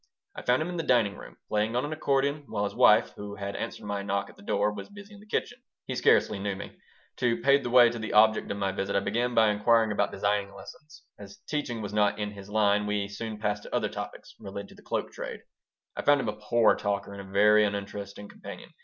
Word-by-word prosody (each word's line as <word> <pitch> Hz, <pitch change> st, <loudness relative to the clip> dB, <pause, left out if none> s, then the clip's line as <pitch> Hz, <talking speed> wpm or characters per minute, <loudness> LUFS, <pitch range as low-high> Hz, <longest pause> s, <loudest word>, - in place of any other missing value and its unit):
I -, -, -6 dB
found 125 Hz, +4 st, +2 dB
him 170 Hz, -, -5 dB
in 175 Hz, -, -4 dB
the -, -, 0 dB
dining 115 Hz, -7 st, +2 dB
room, -, -, -12 dB
playing 105 Hz, +2 st, 0 dB
on 125 Hz, -, +1 dB
an 150 Hz, -, -4 dB
accordion, 140 Hz, -1 st, 0 dB
while 105 Hz, -2 st, -2 dB
his 100 Hz, -, -2 dB
wife, -, -, +5 dB
who 100 Hz, 0 st, -7 dB
had 100 Hz, -1 st, -5 dB
answered 115 Hz, -, -5 dB
my 100 Hz, -1 st, -2 dB
knock 100 Hz, 0 st, -2 dB
at -, -, -22 dB
the -, -, -17 dB
door, 105 Hz, +1 st, 0 dB
was 100 Hz, -1 st, -8 dB
busy 205 Hz, +1 st, -12 dB
in 205 Hz, -, -13 dB
the 210 Hz, -, -17 dB
kitchen 245 Hz, +3 st, -3 dB, 0.2 s
He -, -, -4 dB
scarcely 100 Hz, -, +3 dB
knew 100 Hz, 0 st, -2 dB
me. 95 Hz, -, -9 dB, 0.4 s
To 120 Hz, -2 st, +1 dB
pave 140 Hz, +1 st, +4 dB
the 120 Hz, -, -4 dB
way 120 Hz, -1 st, +7 dB
to 120 Hz, -, -6 dB
the 110 Hz, -, -4 dB
object 110 Hz, +1 st, +4 dB
of 100 Hz, -, -3 dB
my 100 Hz, -1 st, 0 dB
visit 95 Hz, +1 st, -3 dB
I -, -, +4 dB
began 120 Hz, +5 st, -1 dB
by 110 Hz, -2 st, +5 dB
inquiring 110 Hz, +1 st, +3 dB
about 105 Hz, -, 0 dB
designing 100 Hz, -1 st, -1 dB
lessons. 155 Hz, 0 st, -13 dB, 0.2 s
As 100 Hz, -1 st, -11 dB
teaching 125 Hz, -7 st, -3 dB
was 100 Hz, 0 st, -5 dB
not 105 Hz, -1 st, +2 dB
in 105 Hz, -1 st, -3 dB
his 100 Hz, -1 st, -11 dB
line, 105 Hz, -1 st, +2 dB
we 105 Hz, -1 st, -1 dB
soon 110 Hz, +1 st, -6 dB
passed 105 Hz, -1 st, -2 dB
to -, -, -6 dB
other -, -, 0 dB
topics -, -, -8 dB
related 100 Hz, 0 st, -7 dB
to -, -, -15 dB
the -, -, -17 dB
cloak -, -, -3 dB
trade. -, -, -7 dB, 0.5 s
I -, -, -3 dB
found 145 Hz, -1 st, +4 dB
him 115 Hz, -, -1 dB
a -, -, -2 dB
poor 105 Hz, +1 st, +3 dB
talker 100 Hz, -1 st, -2 dB
and 100 Hz, -, -7 dB
a 95 Hz, 0 st, -12 dB
very 105 Hz, +2 st, +5 dB
uninteresting 100 Hz, 0 st, -4 dB
companion. -, -, -11 dB
105 Hz, 245 wpm, -28 LUFS, 100-120 Hz, 0.5 s, way